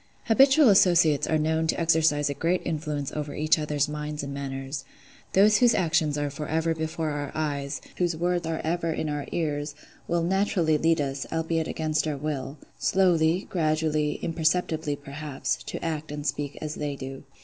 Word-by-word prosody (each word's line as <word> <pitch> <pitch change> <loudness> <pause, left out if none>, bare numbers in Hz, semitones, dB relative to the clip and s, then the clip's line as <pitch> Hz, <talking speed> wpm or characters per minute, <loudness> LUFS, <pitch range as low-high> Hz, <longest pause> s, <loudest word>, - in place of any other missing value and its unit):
Habitual 270 +4 +6
associates 170 -6 +4
are 160 - +2
known 160 +1 +1
to - - 0
exercise 160 -3 +3
a 140 - -1
great 170 +5 0
influence 150 -3 -3
over 150 -1 -4
each 155 +1 +2
other's 150 -1 0
minds 150 0 -4
and 140 0 -5
manners. 135 0 -5 0.5
Those 210 +2 +6
whose 240 -2 +5
actions 160 -4 +1
are 145 -1 -1
for 150 +2 -6
ever 160 +1 +1
before 160 0 -3
our 145 -1 -4
eyes, 140 -3 -2 0.2
whose 175 -2 0
words 175 0 0
are 165 -1 -2
ever 165 +1 -1
in 155 -1 -2
our 145 -1 -3
ears, 145 -2 -2 0.3
will 170 -1 +1
naturally 175 -4 +1
lead 165 +1 +2
us, 135 -1 -2
albeit 165 0 -1
against 155 0 -1
our 150 -2 -2
will, 140 -1 -4 0.2
slowly, 175 -2 +2
gradually, 155 -3 +1
imperceptibly, 160 -2 0
perhaps, 145 0 -4
to - - -5
act 155 -2 -3
and 145 -1 -5
speak 145 -2 -2
as 155 -1 -3
they 145 -2 -3
do. 135 0 -7
155 Hz, 170 wpm, -26 LUFS, 145-165 Hz, 0.5 s, Habitual